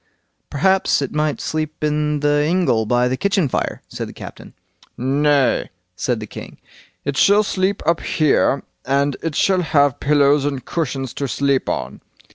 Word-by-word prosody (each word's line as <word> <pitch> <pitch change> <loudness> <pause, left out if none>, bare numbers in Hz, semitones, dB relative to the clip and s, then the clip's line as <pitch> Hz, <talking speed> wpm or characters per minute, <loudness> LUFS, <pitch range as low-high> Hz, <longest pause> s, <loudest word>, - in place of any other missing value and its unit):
"Perhaps 190 0 +2
it 135 - -4
might 150 -1 0
sleep 155 -1 -4
in 150 -1 0
the 145 0 +2
ingle 155 - +1
by 120 +2 +2
the 130 - 0
kitchen 195 +1 +1
fire", - - -3
said - - -6
the - - -10
captain. - - -11 0.4
"Nay", 140 +1 +2 0.3
said 120 +6 -1
the 110 - -6
king, - - -10 0.5
"it 140 0 -2
shall 205 +6 +5
sleep 195 0 -1
up 170 +1 +2
here, 155 -5 +1 0.2
and 140 0 +1
it 165 -3 -3
shall 190 -2 +2
have 145 -5 +2
pillows 145 -1 +3
and 140 -3 -3
cushions 135 -5 -3
to 140 - -3
sleep 140 0 0
on." - - -4
145 Hz, 160 wpm, -20 LUFS, 135-160 Hz, 0.5 s, shall